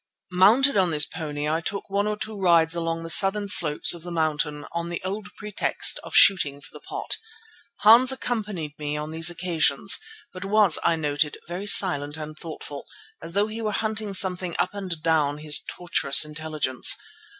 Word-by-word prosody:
Mounted 225 +10 +3
on 185 -2 +1
this 150 -2 +4
pony 150 -3 -6
I 160 +2 -2
took 200 +4 -6
one 200 +1 -2
or 210 0 -3
two 220 +1 -7
rides 170 -4 +2
along 165 -1 -4
the 165 - -8
southern 200 +3 +5
slopes 155 -7 +4
of 170 - -10
the 175 - -10
mountain 150 -3 -3
on 170 0 -5
the 175 - -5
old 205 +2 -6
pretext 210 -1 -1
of - - -10
shooting 150 -8 +4
for - - -16
the - - -12
pot. - - -3 0.6
Hans 235 +5 +6
accompanied 210 - -5
me 150 0 -4
on 150 +1 -7
these 160 +1 +1
occasions, 175 -1 +1 0.3
but 185 0 -9
was, 200 -3 +2
I 165 - +1
noted, 150 -1 -2
very 180 +4 -7
silent 145 -7 +5
and 155 0 -9
thoughtful, 150 -2 -10 0.3
as 170 - -10
though 200 +2 0
he 220 +1 -8
were 215 -1 -3
hunting 215 -2 -4
something 180 -2 -1
up - - -2
and 185 -6 -8
down 150 -3 0
his 150 -1 +4
tortuous 155 -5 +1
intelligence. 150 -4 0
170 Hz, 180 wpm, -23 LUFS, 150-200 Hz, 0.6 s, Hans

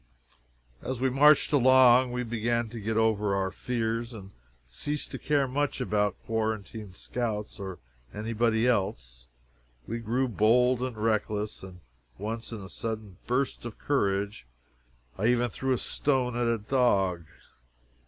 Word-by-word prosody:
As 130 -2 -4
we 130 0 +1
marched 150 +4 +5
along, 130 -2 +6
we 125 0 -2
began 115 0 -1
to 115 +1 -7
get 110 +1 -2
over 105 -3 +2
our 95 -1 -1
fears, 115 +1 -2
and 100 -2 -10 0.4
ceased 145 - -4
to - - -5
care 145 -2 +1
much 145 +2 -1
about 105 -5 0
quarantine 110 -2 -3
scouts 110 +2 -4
or 95 -2 -6 0.3
any 110 - -4
body 115 0 +2
else. 95 - -1 0.6
We 115 +2 -4
grew 120 +4 0
bold 125 +3 +3
and 125 -3 -3
reckless; 105 -1 -1
and 95 -1 -11 0.4
once, 110 +4 -4
in 110 -3 -6
a 95 - -8
sudden 110 -5 -5
burst 130 +2 -1
of 120 -2 -7
courage, 100 - -1 0.7
I 110 - +2
even 120 0 +2
threw 130 +4 -2
a 130 - +3
stone 130 -1 0
at 120 0 0
a 115 0 +2
dog. 100 -7 +1
115 Hz, 145 wpm, -28 LUFS, 105-125 Hz, 0.7 s, along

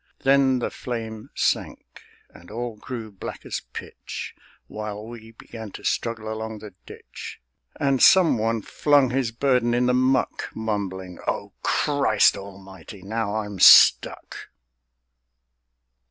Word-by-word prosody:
Then 135 -1 +4
the 120 - -3
flame 110 -3 -6
sank, - - -2 0.3
and 85 - -16
all 120 +1 -5
grew 110 0 -8
black 95 - -9
as - - -4
pitch, - - -8 0.3
While 105 0 -7
we 115 -1 -11
began 110 -1 -10
to - - -10
struggle 110 -2 -2
along 110 0 -6
the 105 0 -11
ditch; - - -10 0.4
And 135 -2 +1
some 175 -10 +6
one 115 0 -1
flung 145 -4 +2
his 130 -3 -1
burden 120 -1 +1
in 125 +1 +2
the 125 - +2
muck, 130 +1 0
Mumbling: 95 -5 -4
"O - - -3
Christ 140 -8 +2
Almighty, 95 -1 -11
now 110 +1 -3
I'm 105 -3 -4
stuck!" - - +5
110 Hz, 125 wpm, -24 LUFS, 105-125 Hz, 0.4 s, some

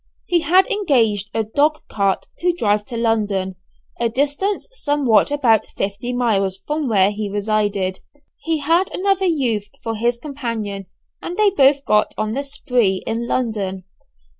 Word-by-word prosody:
He 350 -1 +2
had 365 +4 +4
engaged 230 - +1
a 225 - 0
dog 290 +8 +1
cart 195 -2 0
to 355 +1 +2
drive 210 -9 0
to 235 0 -6
London, 205 -5 0 0.4
a 235 -1 +1
distance 290 - -1
somewhere 290 - +2
about 250 -7 +2
fifty 200 +5 -2
miles 205 -6 0
from 300 -1 -2
where 200 -3 +4
he 210 0 -4
resided. 205 -2 -1 0.4
He 325 -2 -1
had 335 +6 +2
another 390 0 +1
youth 240 - 0 0.2
for 225 - -2
his 235 +2 0
companion, 230 -8 -5 0.3
and 350 - -6
they 425 -2 +4
both 280 -5 +3
got 210 0 +2
on 215 0 -2
the 275 - -1
"spree" 245 -8 0
in 230 +1 -2
London. 205 -7 -2
235 Hz, 150 wpm, -20 LUFS, 205-290 Hz, 0.4 s, had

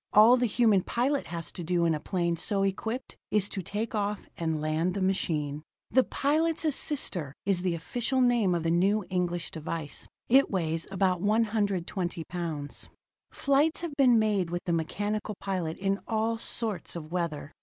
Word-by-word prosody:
All 220 +4 +8
the 245 -1 +2
human 220 -3 +4
pilot 270 +8 0
has 165 -1 -5
to 175 - -6
do 170 0 +1
in 165 - +3
a 155 - -1
plane 170 0 0
so 195 +3 -1
equipped 220 +6 -2
is 210 -2 +2
to 195 - -4
take 210 +5 -3
off 210 -1 -2
and 160 -2 -1
land 155 +4 0
the - - -1
machine. 155 -6 0 0.3
The 260 - +5
Pilot's 315 +5 +1
Assister 235 - -1
is 195 -3 +2
the 180 -2 0
official 240 +10 -1
name 240 -7 +3
of 170 - -1
the 165 - +1
new 195 +4 +2
English 175 -2 -1
device. 160 -1 -5 0.2
It 270 +3 +5
weighs 165 -4 -1
about 190 -2 +1
120 205 -5 0
pounds. 160 -5 -4 0.4
Flights 285 +4 +2
have 340 -3 -4
been 255 -4 +5
made 210 -5 +2
with 175 +1 -3
the 175 - 0
mechanical 205 +6 -2
pilot 180 -5 -2
in 195 +1 0
all 225 0 0
sorts 220 -6 -3
of 155 -2 -7
weather. 170 -4 -2
195 Hz, 170 wpm, -29 LUFS, 170-225 Hz, 0.4 s, All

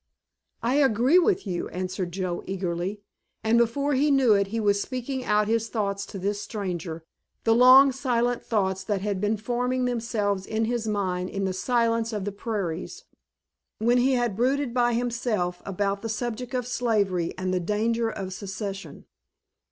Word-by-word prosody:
"I 250 +4 +2
agree 265 - +4
with 365 - +1
you," 180 -3 -3
answered 185 0 -4
Joe 180 -1 -3
eagerly, 190 +1 -3 0.4
and 225 +1 +3
before 280 +5 +1
he 280 +3 +3
knew 270 -5 +5
it 200 -1 +2
he 225 +3 -3
was 205 -2 +2
speaking 255 +1 -4
out 210 -2 +2
his 225 0 0
thoughts 200 -3 -2
to - - -7
this 200 +2 -2
stranger, 175 -7 -5 0.4
the 225 - +4
long, 255 +3 +8
silent 245 -2 0
thoughts 190 -3 0
that 200 -1 -1
had 200 -2 -2
been 210 +1 +1
forming 250 +3 -1
themselves 220 -5 -1
in 220 +1 0
his 235 -1 -2
mind 185 -3 -1
in 195 0 -2
the 190 - -1
silence 230 +2 +1
of 205 -3 -3
the 205 - -2
prairies, 200 -5 -4 0.7
when 240 +3 +3
he 260 +2 +3
had 240 -5 0
brooded 260 +2 +1
by 240 -1 +2
himself 230 -7 -1
about 200 +1 -1
the 225 - -4
subject 240 +2 -3
of 250 -1 -1
slavery 205 -8 0
and 185 0 -2
the 185 - +1
danger 225 +5 0
of 190 -3 -5
secession. 195 0 -6
220 Hz, 165 wpm, -26 LUFS, 195-245 Hz, 0.7 s, long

